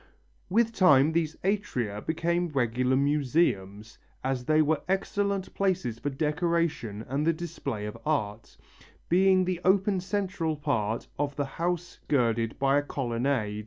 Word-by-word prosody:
With 230 +3 +2
time 150 -7 +5
these 160 -1 0
atria 125 - -1
became 170 +2 0
regular 125 -2 +1
museums, 130 - 0 0.2
as 130 -2 -2
they 155 +2 +3
were 155 -1 +2
excellent 200 0 -1
places 170 - -1
for 145 - -2
decoration 150 - -1
and 135 +3 -1
the 165 - +4
display 150 -10 -5
of 105 - -7
art, 110 -8 -2 0.5
being 185 +1 +4
the 180 -1 -2
open 190 +1 +3
central 185 -4 -2
part 120 -7 -1
of 145 -1 -1
the 145 - -1
house 175 +5 -3
girded 115 -4 +1
by 135 +1 +3
a - - -1
colonnade. 120 -5 -1
150 Hz, 135 wpm, -28 LUFS, 125-175 Hz, 0.5 s, time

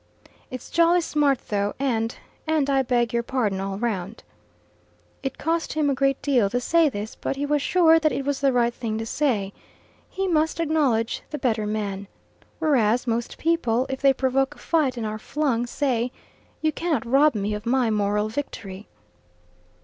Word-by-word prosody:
"It's 255 - -8
jolly 340 +1 +4
smart 290 -5 0
though, 205 -1 -1
and 230 -4 -1 0.3
and 305 -3 +1
I 270 -1 +3
beg 240 -2 0
your 235 - +2
pardon 235 -6 -1
all 195 0 -3
round." 210 -2 -3 1.0
It 270 -1 -4
cost 325 +2 -1
him 300 -2 +1
a - - +2
great 275 +1 +1
deal 250 -8 +3
to 245 - 0
say 325 +5 +3
this, 210 -3 -6
but - - -4
he 280 +1 -2
was 295 0 +1
sure 325 0 +5
that 310 -1 +2
it 275 - -3
was 285 -1 -1
the 275 -1 +3
right 240 -1 +2
thing 225 -3 -3
to 225 - -3
say. 220 -7 0 0.6
He 385 0 -2
must 320 -2 +1
acknowledge 285 -8 +1
the 300 - -4
better 220 -6 0
man. 200 -2 -3 0.5
Whereas 250 -7 +2
most 235 -1 -2
people, 260 -8 +1
if 265 - -4
they 275 -1 +6
provoke 270 +2 0
a - - -20
fight 290 -7 0
and 230 - -3
are 215 0 -4
flung, 250 -3 -1
say, 250 -2 -1 0.5
"You 310 - +3
cannot 315 -7 -1
rob 275 +3 +4
me 205 0 -1
of 210 +1 -5
my 245 -2 +2
moral 210 0 +1
victory." 215 -5 -6
255 Hz, 180 wpm, -24 LUFS, 220-295 Hz, 1.0 s, they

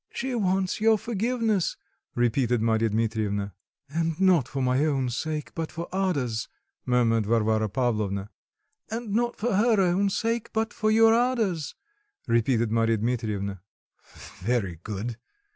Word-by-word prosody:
"She 260 +1 -4
wants 190 -3 0
your 220 0 +5
forgiveness," 225 -2 0 0.4
repeated 120 0 +2
Marya 110 0 +2
Dmitrievna. 105 -2 -1 0.3
"And 165 +2 -2
not 180 -9 +4
for 135 - -5
my 130 +2 +2
own 135 -5 0
sake, 155 +4 -3
but 165 -2 -4
for 170 0 -5
Ada's," 140 -13 -1 0.4
murmured 115 -3 +2
Varvara 110 -1 +2
Pavlovna. 105 -4 -1 0.6
"And 225 -1 -4
not 240 +2 +1
for 235 +1 -1
her 215 +2 +3
own 190 +2 +2
sake, 230 +3 -1
but 220 +1 -1
for 215 - 0
your 225 +1 +6
Ada's," 225 - 0 0.5
repeated 115 -1 +2
Marya 115 0 +2
Dmitrievna. 105 -4 -2 0.8
"Very 100 -6 -1
good. 110 +3 -5
135 Hz, 130 wpm, -26 LUFS, -, 0.8 s, your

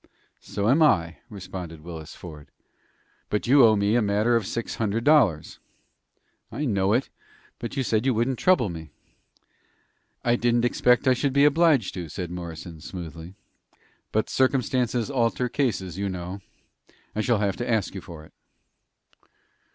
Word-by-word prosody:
"So 100 +1 -3
am 140 +7 +4
I," 85 - +3
responded 90 -5 -8
Willis 80 -1 -9
Ford. 75 -4 -11 0.8
"But 105 - -1
you 135 +2 +6
owe 110 -2 +6
me 100 +1 +1
a 120 - +3
matter 105 +3 +2
of 110 -4 0
six 115 - -4
hundred 110 +1 -1
dollars." 120 - +3 0.9
"I 150 - -3
know 100 -4 +1
it, 125 +4 0 0.5
but 120 +4 -6
you 135 - +1
said 110 -2 0
you 130 - +2
wouldn't 120 +3 0
trouble 180 - +3
me." 80 -3 -7 1.4
"I 120 0 +3
didn't 120 0 +2
expect 125 +1 +2
I 130 - +6
should 135 +2 -1
be 140 +1 +5
obliged 150 - +3
to," 90 -4 -6
said 90 +1 -5
Morrison, 85 -2 -8
smoothly. 85 0 -8 0.8
"But 110 - 0
'Circumstances 130 -2 0
alter 125 -1 0
cases,' 95 - -2
you 100 0 -1
know. 90 +1 -6 0.8
I 110 - 0
shall 120 0 +2
have 100 -1 -1
to 120 - -4
ask 110 -4 0
you 95 - -6
for 85 -4 -11
it." - - -21
110 Hz, 155 wpm, -25 LUFS, 90-125 Hz, 1.4 s, you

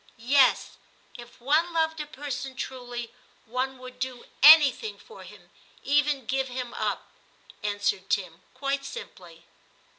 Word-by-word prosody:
* - - -32 0.2
Yes; 265 -3 +4 0.4
if 240 -1 -13
one 310 +7 +1
loved 320 -1 0
a 300 - -4
person 275 -2 -6
truly, 245 -2 -6 0.3
one 255 +3 -3
would 255 0 -12
do 255 -1 -5 0.2
anything 310 - +7
for 460 - -14
him; - - -15 0.3
even 290 -2 +1
give 265 +2 -1
him 250 -1 -6
up,' - - -2 0.6
answered 205 -2 -1
Tim 180 -3 -2
quite 275 +1 -2
simply. 470 - -10
265 Hz, 130 wpm, -26 LUFS, 245-290 Hz, 0.6 s, anything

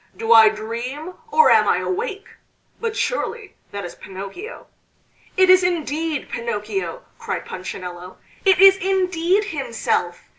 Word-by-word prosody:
do 225 +1 +3
I 220 -1 +8
dream, 235 +10 -6 0.2
or 465 +1 +5
am - - +5
I - - +3
awake? 415 +1 -3 0.5
But 460 -1 -3
surely 465 -4 -3 0.2
that 200 -2 -5
is 175 - -8
Pinocchio!" 195 - -9 0.7
"It 375 0 +5
is 370 0 +6
indeed 320 -3 -2
Pinocchio!" 210 -6 -4 0.2
cried - - -4
Punchinello. 180 -1 -8 0.3
"It 385 -1 +5
is 390 0 +8
indeed 370 0 +1
himself!" 235 - -2
310 Hz, 125 wpm, -21 LUFS, -, 0.7 s, I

